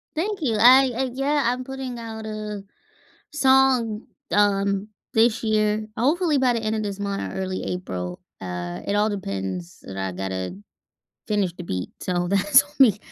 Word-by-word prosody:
Thank 390 +4 -2
you, 235 -7 +1
I 255 +3 +7
I 260 +1 -1
yeah, 285 +3 +1
I'm 250 +2 0
putting 265 -1 -6
out 225 -1 -7
a 210 -2 -5 0.7
song, 265 -6 +3 0.2
um, 200 0 +2 0.2
this 225 0 +3
year, 215 -1 +1
hopefully, 300 +5 +2
by 255 -2 +3
the 230 - -1
end 220 0 -1
of 215 - -2
this 200 -1 -4
month 200 -1 -3
or - - -7
early 185 0 -3
April, 90 - -4 0.2
uh, 90 -1 -5
it 200 - 0
all 210 +1 +3
depends 95 - -5
that 95 - -9
I 95 -1 -2
gotta 95 0 -4 0.7
finish 205 -4 0
the 180 - -8
beat, 90 - -4
so, 175 -1 -1
that's 200 +1 +5
on 190 - -18
me, 230 -7 +6
210 Hz, 170 wpm, -24 LUFS, 180-250 Hz, 0.7 s, I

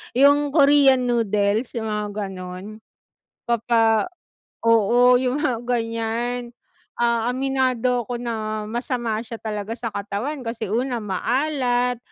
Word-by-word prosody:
yung 285 +2 +5
Korean 275 -3 +5
noodles 215 -1 +1
yung 220 -2 -2
mga 210 0 -2 0.2
ganun 185 +3 -8 0.7
papa 225 +1 +2 0.5
oo 235 +2 +5
yung 260 +4 -1
mga 250 -6 0
ganyan, 235 +1 -2 0.4
ah, 235 -1 +1
aminado 255 -2 0
ko 245 - -4
na 220 -3 -3
masama 240 -2 -2
siya 230 0 -7
talaga 215 0 -4
sa 230 -1 -5
katawan 210 +9 -4
kasi 225 -3 -4
una 245 +1 -1
maalat, 245 +3 0
235 Hz, 115 wpm, -22 LUFS, 220-250 Hz, 0.7 s, yung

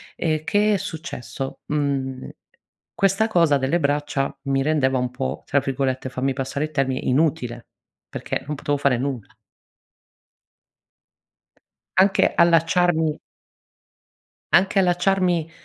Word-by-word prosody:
Ehm, 155 -1 -1
che 210 +4 +2
è - - +1
successo, 155 - -6
mhmm, 135 -3 -2 0.7
questa 195 +3 +2
cosa 170 -9 +3
delle 135 +6 0
braccia 145 -2 -1
mi 135 0 0
rendeva 135 -3 +1
un 125 0 -1
po', 130 +1 -4
tra 140 - +2
virgolette 130 -1 -2
fammi 130 +1 -1
passare 135 +2 -3
il 155 - -9
termine, 135 -3 0
"inutile" 130 -4 0 0.4
perché - - -4
non 150 - -3
potevo 145 +1 -1
fare 140 -3 +2
nulla. 130 -4 -3 2.7
Anche 195 +1 +4
allacciarmi 165 -1 +3 1.3
anche 195 +1 +4
allacciarmi 180 -2 +1
145 Hz, 110 wpm, -22 LUFS, 135-170 Hz, 2.7 s, Anche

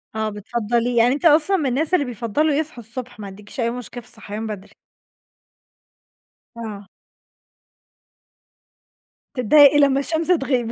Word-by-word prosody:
آه، 220 0 -1
بتفضّليه. 235 +3 -2
يعني 235 +2 +4
أنتِ 290 +5 -4
أصلًا 325 +5 +4
من 310 - -2
الناس 300 +7 -1
اللي 300 -6 +3
بيفضّلوا 245 +6 -1
يصحُوا 295 -5 -3
الصبح، 240 +1 -8
ما 205 - -7
عندكيش 205 +5 -12
أي 235 -1 +1
مشكلة 245 0 -7
في 235 - -19
الصحيان 220 0 -6
بدري؟ 205 -3 -8 1.8
آه. 210 -4 -7 2.5
تتضايقي 285 +4 +6
لما 275 -1 +4
الشمس 320 +3 -2
تغيب. 270 -9 +1
245 Hz, 130 wpm, -21 LUFS, 220-290 Hz, 2.5 s, تتضايقي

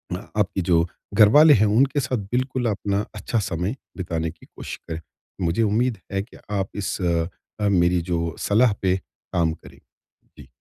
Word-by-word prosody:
अ, 90 - -7
आपकी 95 -2 +1
जो 85 0 +4 0.3
घरवाले 130 +10 +7
हैं 110 -4 +4
उनके 140 +3 +3
साथ 130 -1 -1
बिल्कुल 130 0 -1
अपना 100 0 -1
अच्छा 115 - -1
समय 95 +3 -2 0.2
बिताने 80 -3 -2
की 80 - -19
कोशिश - - -8
करें। 80 0 -5 0.4
मुझे 90 +6 +1
उम्मीद 110 +3 +1
है 95 - 0
कि 110 - -16 0.2
आप 95 - -2
इस 100 -2 -2
अ, 85 +4 -2
मेरी 90 -2 +3
जो 85 -2 -2
सलाह 110 +2 +3
पे 95 -1 +2 0.4
काम 85 -2 +2
करें। 80 - -15 0.6
जी। - - -13
100 Hz, 165 wpm, -23 LUFS, 85-115 Hz, 0.6 s, घरवाले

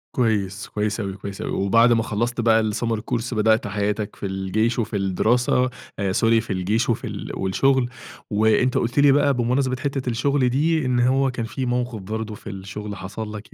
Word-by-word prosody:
كويس، 105 -5 0
كويس 105 0 -2
أوي، 100 -3 -3
كويس 100 0 -7
أوي، - - -3
وبعد 115 +5 +4
ما 115 -1 +2
خلّصت 120 +3 -1
بقى 110 -1 +3
الsummer 115 +1 -1
course 120 0 -1
بدأت 110 -1 +2
حياتك 105 +1 -2
في - - -7
الجيش 100 +5 -1
وفي 110 -1 -2
الدراسة 120 +6 +2 0.3
آآ 100 -1 0
sorry 115 +1 +3
في 115 - -14
الجيش 105 +6 0
وفي 115 - -1
ال - - -6
والشغل، 125 +6 +1 0.4
وأنت 110 +4 +2
قُلت 120 +4 0
لي 140 0 +6
بقى 145 0 +3
بمناسبة 130 +1 +1
حتّة 135 -3 -2
الشغل 130 +2 +1
دي، 155 +4 +1
إن 125 -1 +1
هو 130 +2 +3
كان 115 -3 -3
في 130 +3 -4
موقف 125 -2 -1
برضه 110 +2 -4
في 105 - -10
الشغل 100 +1 -6
حصل 105 +3 -6
لَك 105 +2 -10
115 Hz, 185 wpm, -23 LUFS, 105-125 Hz, 0.4 s, لي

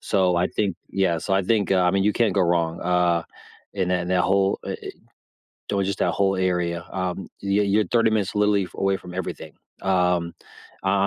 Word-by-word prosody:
So 95 -3 +1
I 90 +1 +2
think 100 -4 -1 0.2
yeah. 95 -4 +1
So 95 +4 -1
I 95 - +2
think, 105 0 +1
uh 90 -1 +3
I 90 - +4
mean, 95 +1 +1
you 105 - +3
can't 115 -5 +2
go 100 - +2
wrong, 85 -1 0
uh, 90 -1 +2 0.5
in 95 -2 -1
that 90 -1 0
that 90 -1 +2
whole, 95 +2 +2
eh - - -3
eh - - -5 0.8
do 100 -1 0
it - - +1
just 100 0 -3
that - - +2
whole 95 -1 +1
area, 90 -2 -1
um, 90 -1 -3
y 100 +1 +2
you're 100 +2 +2
30 115 -2 +3
minutes 105 -3 0
literally 105 -2 +2
away 95 0 +1
from 90 - -11
everything, 95 -1 -5 0.3
um, 90 -3 +1 0.5
uh, - - -3
I 100 0 +3
95 Hz, 210 wpm, -23 LUFS, 90-100 Hz, 0.8 s, I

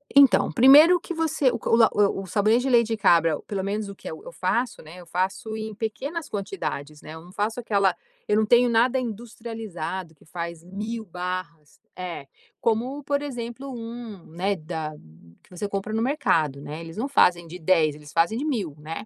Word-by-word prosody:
Então, 280 -3 +6
primeiro 295 +8 +8
que 345 - -6
você 315 -4 +1
o - - -2
c - - -5
o - - +5
la 230 -1 +6
o 200 -1 +2
o - - -10
sabonete 215 +6 +2
de 270 - 0
leite 235 -3 +5
de 225 0 -1
cabra, 165 -6 +4
pelo 195 -2 -3
menos, 205 +1 -2
o 200 - -8
que - - -9
eu 160 - -8
eu - - -9
faço, 235 +9 -1
né, 160 +3 -12
eu 175 - -12
faço 190 +5 -2
em 220 0 -5
pequenas 275 - -4
quantidades, 175 -7 -5
né. 155 - -10
Eu 160 - -9
não 175 - -14
faço 215 +5 -2
aquela 200 -5 +2 0.3
eu 210 - +3
não 220 - +3
tenho 240 +3 +5
nada 240 +3 +3
industrializado 220 -7 -6
que - - -23
faz 170 0 -6
1.000 215 +5 -5
barras, 180 -4 -6 0.2
É. 175 -6 -6 0.3
Como, 245 +6 0
por 285 0 0
exemplo, 255 -1 -6
um 230 -5 -8
né, 185 +5 -1
da 155 -2 -5 0.5
que - - -25
você 180 +3 -4
compra 200 +2 -3
no 225 - 0
mercado, 165 - +1
né. 150 +2 -7
Eles 165 +2 -9
não 240 +5 -1
fazem 175 -11 +3
de 170 +2 -8
10, 160 -3 +3
eles 150 -1 -13
fazem 170 +7 +2
de 280 - -2
1.000, 210 - -2
né. 160 +5 -6
205 Hz, 205 wpm, -25 LUFS, 170-235 Hz, 0.5 s, primeiro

